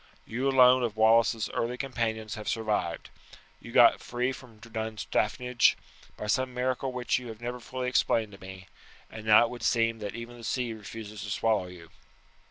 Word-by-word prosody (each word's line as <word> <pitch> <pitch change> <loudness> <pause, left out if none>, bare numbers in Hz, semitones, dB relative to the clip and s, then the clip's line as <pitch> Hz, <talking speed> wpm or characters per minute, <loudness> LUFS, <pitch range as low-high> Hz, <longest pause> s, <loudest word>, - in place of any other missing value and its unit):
You 125 +5 -1
alone 130 -1 +6
of 115 -3 -2
Wallace's 110 -1 +4
early 120 +2 -2
companions 110 -5 -3
have 105 - -5
survived. 105 -7 -2 0.5
You - - -11
got - - +6
free 125 +1 -2
from 125 -4 -12
Dunstaffnage 110 +2 0 0.4
by - - -5
some 130 +4 0
miracle 130 +1 -1
which 125 +1 0
you 125 - -9
have 110 -2 -8
never 120 +1 -5
fully 125 +1 -5
explained 115 -4 +1
to 100 - -14
me, 95 0 -10 0.5
and 110 0 -9
now 110 +1 +8
it 115 - -2
would 120 - -8
seem 115 -1 +1
that 105 0 -5
even 120 +1 -8
the - - -12
sea 120 +1 -2
refuses 110 -1 -9
to 105 - -6
swallow 105 -2 +1
you." 85 -2 -13
115 Hz, 180 wpm, -28 LUFS, 110-125 Hz, 0.5 s, now